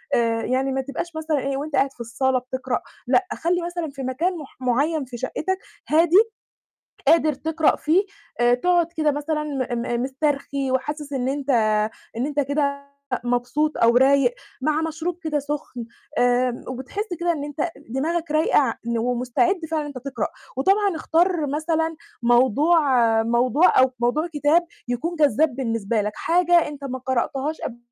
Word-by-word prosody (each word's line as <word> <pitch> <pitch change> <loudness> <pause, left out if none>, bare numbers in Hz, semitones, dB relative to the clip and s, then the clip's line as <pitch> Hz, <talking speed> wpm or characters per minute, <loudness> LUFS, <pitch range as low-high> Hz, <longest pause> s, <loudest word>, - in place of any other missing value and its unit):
آآ 230 -1 +1
يعني 265 +1 0
ما 265 0 0
تبقاش 285 +5 -6
مثلًا 315 -2 -1
إيه 270 0 -2
وأنت 295 +1 -4
قاعد 275 0 +2
في - - -31
الصالة 255 +3 0
بتقرأ 255 0 -3 0.3
لأ، 370 +9 +3
خلّي 350 +2 0
مثلًا 345 -2 -3
في 270 -1 -7
مكان 330 +8 -1
مح 295 -4 -11
معيّن 280 +4 +1
في 240 -1 -8
شقّتك 375 +9 -2 0.3
هادي، 330 +3 +5 0.9
قادر 315 0 +5
تقرأ 320 +2 +1
فيه 335 +6 +2 0.4
آآ، 240 0 +5
تقعُد 350 +5 +2
كده 305 -1 +2
مثلًا 300 +1 -2
م 260 -5 -2
م 240 0 -1
مِسترخي 275 0 -1
وحاسس 295 +2 -2
إن 260 -1 -1
أنت 280 0 -2 0.7
إن 250 +4 -1
أنت 290 -1 0
كده 280 0 -1 0.3
مبسوط 245 +6 0
أو 235 +1 +4
رايق 265 -1 +4 0.3
مع 310 +2 +1
مشروب 320 +2 -3
كده 305 -3 0
سخن 280 -4 -5 0.3
آمم، 245 0 +2
وبتحس 260 - -5
كده 345 0 +2
إن 290 -3 -4
أنت 295 +3 -2 0.2
دماغك 320 +5 -1
رايقة 310 +1 +3
ع 260 -6 +2
ن 235 -1 0
ومستعد 250 - +1
فعلًا 315 -2 0
إن - - -6
أنت 280 -3 -7
تقرأ 250 -4 -3 0.3
وطبعًا 390 +5 +2
اختار 330 0 +1
مثلًا 320 +2 -1 0.3
موضوع 260 +7 +4 0.4
موضوع 240 +8 +3
أو 260 0 +4
موضوع 270 +8 +1
كتاب 320 +2 +2 0.2
يكون 325 +8 -2
جذّاب 295 -1 +3
بالنسبة 230 -4 -1
لك، 210 +1 -2
حاجة 345 -1 +3
أنت 285 -1 -8
ما 260 -1 -4
قرأتهاش 265 +4 -2
قبل 240 - -5
285 Hz, 160 wpm, -23 LUFS, 255-320 Hz, 0.9 s, هادي